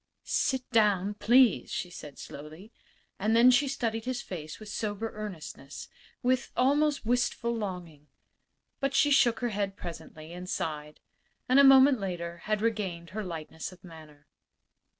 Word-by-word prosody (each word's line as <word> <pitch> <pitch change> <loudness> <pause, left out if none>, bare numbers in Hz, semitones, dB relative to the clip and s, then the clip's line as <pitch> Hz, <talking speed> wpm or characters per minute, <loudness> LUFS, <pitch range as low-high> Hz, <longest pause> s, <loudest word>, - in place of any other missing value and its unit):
"Sit 260 -2 0
down, 205 -3 +3
please," 240 +2 +4
she 180 - -4
said, 150 -4 -10
slowly. 155 +9 -10 0.5
And 215 +3 +1
then 240 +2 +7
she 275 +3 +3
studied 230 -4 -2
his 255 -1 -2
face 155 -4 -7
with 215 -1 -10
sober 215 +1 -3
earnestness 175 -9 -8 0.3
with 255 +1 +1
almost 285 +1 +2
wistful 240 0 0
longing. 180 -8 -6 0.7
But 275 -1 -1
she 290 +1 +4
shook 235 -5 +4
her 240 - 0
head 200 -2 -2
presently, 160 -1 -9
and 180 +1 -8
sighed; 150 -1 -4 0.5
and 255 +2 +5
a - - +8
moment 270 -1 +7
later 170 -3 -4
had 215 0 0
regained 190 -7 -2
her 215 +2 -4
lightness 160 -2 -6
of 185 - -17
manner. 155 -4 -14
210 Hz, 150 wpm, -29 LUFS, 170-245 Hz, 0.7 s, a